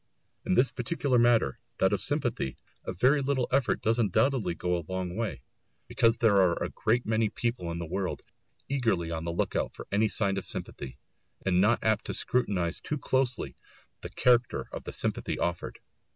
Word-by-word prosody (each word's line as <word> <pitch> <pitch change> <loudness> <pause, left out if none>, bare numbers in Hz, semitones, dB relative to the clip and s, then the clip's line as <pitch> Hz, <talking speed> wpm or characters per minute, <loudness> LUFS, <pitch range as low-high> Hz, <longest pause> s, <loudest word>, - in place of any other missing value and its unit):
In - - +3
this 130 +2 +4
particular 130 0 0
matter, 115 - +3 0.2
that - - +3
of - - 0
sympathy, 65 - -1 0.3
a - - -2
very 130 +10 +3
little 135 -2 0
effort 135 -1 +1
does 115 +2 +2
undoubtedly 110 -2 +2
go 90 +1 -1
a 85 -3 -4
long 95 -1 -3
way, 110 - -3 0.4
because 115 0 +3
there 110 -4 +4
are 90 -2 +3
a - - -3
great 115 +2 0
many 110 0 +1
people 110 -6 -2
in 85 - -4
the 85 - -4
world 90 +3 -3 0.4
eagerly 110 -12 0
on 80 0 -3
the 85 - -1
look 85 - -1
out - - -1
for - - -8
any 105 +2 +2
sign 100 -2 0
of 95 - -4
sympathy, 65 - -6 0.5
and 90 -1 +3
not 110 +4 +3
apt 110 -1 +1
to - - -3
scrutinise 90 -9 0
too 150 - -3
closely 130 -2 -1 0.5
the - - -6
character 125 -1 +2
of - - -7
the - - -5
sympathy - - -2
offered. 85 0 -2
110 Hz, 185 wpm, -29 LUFS, 90-125 Hz, 0.5 s, this